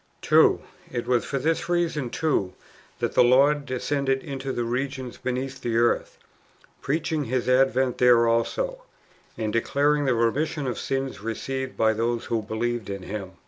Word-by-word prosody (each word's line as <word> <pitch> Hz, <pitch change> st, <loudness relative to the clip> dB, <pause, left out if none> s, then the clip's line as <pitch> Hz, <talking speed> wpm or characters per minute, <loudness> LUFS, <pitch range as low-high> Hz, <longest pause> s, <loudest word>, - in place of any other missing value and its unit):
2. -, -, +5 dB, 0.3 s
It 120 Hz, -2 st, -3 dB
was 125 Hz, -1 st, +1 dB
for 140 Hz, -, -2 dB
this 160 Hz, +5 st, -1 dB
reason, 165 Hz, -7 st, 0 dB
too, 130 Hz, -, 0 dB, 0.4 s
that -, -, -2 dB
the -, -, +6 dB
Lord 140 Hz, +4 st, +4 dB
descended? 135 Hz, +1 st, -1 dB
into 135 Hz, -3 st, -4 dB
the 120 Hz, -, -2 dB
regions 130 Hz, +1 st, -3 dB
beneath 130 Hz, +1 st, -3 dB
the 115 Hz, -1 st, -1 dB
earth, 120 Hz, 0 st, +1 dB, 0.6 s
preaching 155 Hz, +1 st, -1 dB
His 125 Hz, +1 st, -1 dB
advent 130 Hz, 0 st, +2 dB
there 120 Hz, -1 st, +6 dB
also, -, -, 0 dB, 0.6 s
and 110 Hz, -1 st, -2 dB
[declaring] 145 Hz, +5 st, +1 dB
the 130 Hz, -2 st, +2 dB
remission 140 Hz, +6 st, 0 dB
of 125 Hz, -, -3 dB
sins 135 Hz, -3 st, -3 dB
received 130 Hz, +4 st, -4 dB
by 110 Hz, 0 st, +3 dB
those 115 Hz, +1 st, -1 dB
who 115 Hz, -2 st, -1 dB
believe 110 Hz, 0 st, -3 dB
in 100 Hz, -1 st, -5 dB
Him. 95 Hz, -2 st, -6 dB
130 Hz, 155 wpm, -25 LUFS, 115-140 Hz, 0.6 s, the